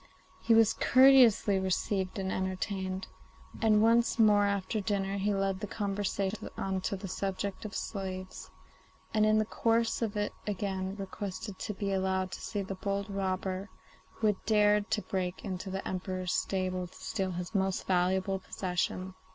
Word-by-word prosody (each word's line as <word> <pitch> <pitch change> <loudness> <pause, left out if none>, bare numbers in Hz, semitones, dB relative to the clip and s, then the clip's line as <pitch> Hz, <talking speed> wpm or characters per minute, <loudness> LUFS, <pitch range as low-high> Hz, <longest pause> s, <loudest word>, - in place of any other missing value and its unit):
He 230 - +4
was 225 -1 +5
courteously 255 -6 +6
received 190 +1 -1
and 190 -1 -2
entertained, 190 0 -2 0.6
and 215 -2 +4
once 230 +1 +4
more 210 -2 +5
after 200 +2 -1
dinner 195 -1 -1
he 205 +2 +1
led 195 -1 0
the 210 - -4
conversation 200 0 -2
on 190 -1 -1
to 200 - -2
the 195 +1 -6
subject 195 +2 -3
of 210 - -6
slaves, 185 -2 -5 0.6
and 215 -1 +4
in 215 0 +4
the 215 - +2
course 230 +1 +1
of 215 -2 -1
it 205 0 -1
again 190 -1 -2
requested 195 0 -6
to 210 - -4
be 200 0 -2
allowed 190 -1 0
to - - -7
see 205 -2 -3
the 195 - -5
bold 200 +1 -3
robber 190 0 -2 0.4
who 220 - -3
had 210 -2 +1
dared 210 -1 +4
to 210 - 0
break 185 0 -3
into 190 -1 -4
the 190 +1 -4
Emperor's 185 0 -3
stable 185 -1 -1
to - - -19
steal 195 -4 -3
his 175 +3 -5
most 190 -2 0
valuable 190 +1 +1
possession. 185 0 -2
195 Hz, 160 wpm, -31 LUFS, 190-210 Hz, 0.6 s, courteously